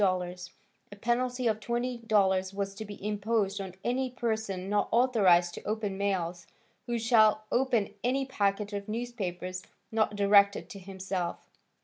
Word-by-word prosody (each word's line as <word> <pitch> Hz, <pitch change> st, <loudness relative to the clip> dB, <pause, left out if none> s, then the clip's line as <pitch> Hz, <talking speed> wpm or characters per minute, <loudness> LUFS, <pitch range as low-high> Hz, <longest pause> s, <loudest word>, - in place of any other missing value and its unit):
A 180 Hz, -2 st, +1 dB, 0.6 s
penalty 250 Hz, +2 st, 0 dB
of 220 Hz, -2 st, +2 dB
$20 220 Hz, -6 st, +1 dB
was 195 Hz, -1 st, -2 dB
to 215 Hz, +2 st, -7 dB
be 205 Hz, 0 st, -7 dB
imposed 210 Hz, -1 st, 0 dB
on 190 Hz, -2 st, -7 dB
any 255 Hz, +2 st, 0 dB
person 220 Hz, -6 st, -2 dB
not 205 Hz, 0 st, +1 dB
authorized 195 Hz, -8 st, +4 dB
to -, -, -8 dB
open 210 Hz, -2 st, -2 dB
mails, 180 Hz, -3 st, -2 dB, 0.4 s
who 240 Hz, -1 st, 0 dB
shall 220 Hz, -2 st, +4 dB
open 240 Hz, -6 st, +1 dB
any 265 Hz, +3 st, +1 dB
packet 205 Hz, -4 st, -1 dB
of 200 Hz, +1 st, -5 dB
newspapers 190 Hz, -6 st, -4 dB, 0.3 s
not 220 Hz, -1 st, +1 dB
directed 200 Hz, 0 st, +4 dB
to 200 Hz, -, -8 dB
himself. 190 Hz, -2 st, -5 dB
205 Hz, 135 wpm, -29 LUFS, 195-230 Hz, 0.6 s, authorized